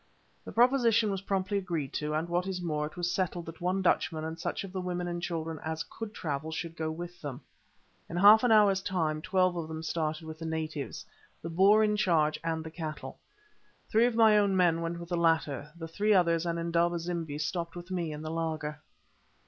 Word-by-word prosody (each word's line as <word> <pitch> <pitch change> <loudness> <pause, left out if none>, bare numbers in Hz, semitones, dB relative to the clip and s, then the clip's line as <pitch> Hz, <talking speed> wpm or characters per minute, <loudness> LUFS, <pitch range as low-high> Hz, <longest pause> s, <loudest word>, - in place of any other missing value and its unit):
The - - -7
proposition 235 -3 +4
was 195 -1 -3
promptly 195 +1 -1
agreed 165 -8 -3
to, 150 0 -2
and, 160 +2 -1
what 175 +2 -1
is 190 -1 -3
more, 150 -4 -2
it 155 - -14
was 175 0 -1
settled 175 -2 -1
that 165 +1 -10
one 185 +2 0
Dutchman 160 -3 +1
and 160 +1 -5
such - - -3
of 195 - -8
the 190 0 -3
women 180 -1 -3
and 175 0 -3
children 165 -2 -3
as 160 0 -3
could 225 -2 -8
travel 155 -5 -4
should 165 +1 -5
go 160 -1 -2
with 175 +2 -7
them. 140 -1 -6 0.7
In 170 - -4
half 210 +5 +8
an 245 - +3
hour's 205 -3 +5
time 165 -6 -1
twelve 185 0 +2
of 165 -2 -3
them 160 0 -6
started 155 0 -2
with 160 0 -8
the 165 - -6
natives, 155 -6 -4 0.4
the 165 - -4
Boer 200 +5 +5
in 210 0 +2
charge, 155 -6 +2
and 160 -1 -2
the 160 - -8
cattle. 160 -2 -6 0.7
Three 225 +2 +5
of 245 - -2
my 220 -2 +6
own 200 -2 +2
men 170 -2 +3
went 170 +1 -3
with 170 0 -9
the 175 - 0
latter, 160 -3 +1
the 165 -1 -6
three 205 +5 +2
others 170 -2 +3
and 170 0 -1
Indaba 170 +1 +1
zimbi 165 -3 -4
stopped 170 +3 -3
with 175 +1 -9
me 170 -4 -2
in 150 +1 -6
the 155 - -4
laager. 155 -2 -3
170 Hz, 215 wpm, -30 LUFS, 160-185 Hz, 0.7 s, half